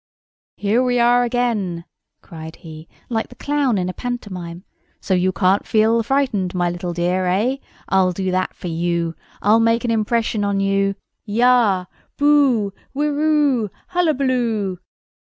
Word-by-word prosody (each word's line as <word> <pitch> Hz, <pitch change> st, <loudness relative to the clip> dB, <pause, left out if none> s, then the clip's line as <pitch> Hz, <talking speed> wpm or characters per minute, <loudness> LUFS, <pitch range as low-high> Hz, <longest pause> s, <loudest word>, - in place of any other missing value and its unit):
"Here 210 Hz, +4 st, +1 dB
we 250 Hz, -1 st, +1 dB
are 240 Hz, +1 st, +4 dB
again!" 225 Hz, -8 st, -1 dB, 0.4 s
cried 160 Hz, -1 st, -9 dB
he, 160 Hz, -1 st, -11 dB, 0.2 s
like 225 Hz, -2 st, -2 dB
the -, -, -14 dB
clown 285 Hz, -6 st, 0 dB
in 180 Hz, -1 st, -1 dB
a 185 Hz, -, -3 dB
pantomime. 185 Hz, -9 st, -6 dB, 0.4 s
"So 190 Hz, -, -2 dB
you 185 Hz, +1 st, +2 dB
can't 185 Hz, +2 st, +2 dB
feel 225 Hz, +1 st, +3 dB
frightened, 225 Hz, -8 st, 0 dB
my 175 Hz, -1 st, +1 dB
little 175 Hz, 0 st, -4 dB
dear—eh? 185 Hz, +8 st, 0 dB, 0.3 s
I'll 190 Hz, -1 st, +3 dB
do 185 Hz, +1 st, -2 dB
that 185 Hz, 0 st, -1 dB
for -, -, -7 dB
you. 170 Hz, 0 st, -1 dB, 0.3 s
I'll 215 Hz, +3 st, +5 dB
make 230 Hz, +1 st, +2 dB
an 235 Hz, -, 0 dB
impression 225 Hz, -1 st, 0 dB
on 200 Hz, -1 st, 0 dB
you! 195 Hz, 0 st, +1 dB, 0.3 s
Yah! 225 Hz, -4 st, +3 dB, 0.3 s
Boo! 275 Hz, -9 st, +3 dB, 0.2 s
Whirroo! 295 Hz, -5 st, +1 dB, 0.2 s
Hullabaloo!" 255 Hz, -, 0 dB
210 Hz, 135 wpm, -20 LUFS, 185-245 Hz, 0.4 s, I'll